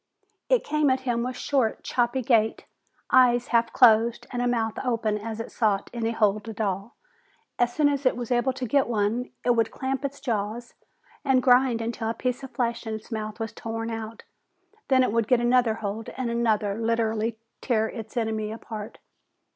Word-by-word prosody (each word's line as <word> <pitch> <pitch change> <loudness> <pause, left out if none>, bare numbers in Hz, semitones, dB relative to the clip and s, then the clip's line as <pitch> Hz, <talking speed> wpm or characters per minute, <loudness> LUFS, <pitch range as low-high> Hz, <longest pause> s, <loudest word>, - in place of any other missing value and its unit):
It - - +3
came 300 -1 +1
at 260 0 +1
him 240 -2 -1
with 250 +1 -3
a - - -9
short, 260 -6 0
choppy 245 +1 0
gait, 225 -2 +2 0.5
eyes 245 -2 +5
half 235 -1 +2
closed 230 -2 +4
and 245 - -2
mouth 225 -2 -1
open 230 -4 0
as 220 +1 -6
it 225 - -6
sought 205 -4 0
any 230 -2 -1
hold 215 -1 +1
at 220 - -8
all. 200 +1 -2 0.6
As 240 0 +3
soon 300 -2 +4
as 285 -1 0
it 255 - +2
was 245 0 -5
able 245 +2 +2
to 260 -1 -4
get 275 +3 +2
one, 230 +2 0 0.2
it 245 - +4
would 230 -2 +2
clamp 265 +1 -3
its 280 0 -4
jaws 230 -1 -3 0.5
and 265 -3 +3
grind 250 -2 +4
until 230 0 -3
the 225 - -1
piece 250 0 -2
of 270 - -7
flesh 235 -2 -2
in 220 - -2
its 220 - -10
mouth 215 0 -4
was 225 -1 -4
torn 225 0 -4
out. 225 0 -6 0.6
Then 260 -1 +4
it 250 - +1
would 230 -1 +1
get 250 0 +4
another 240 -2 +3
hold, 220 0 -5
and 250 -3 -2
another, 220 -3 +1
and 220 +3 -4
literally 225 -1 0 0.2
tear 220 -4 +1
its 220 +2 -8
enemy 220 -2 -1
apart. 220 -1 -7
230 Hz, 195 wpm, -26 LUFS, 220-250 Hz, 0.6 s, eyes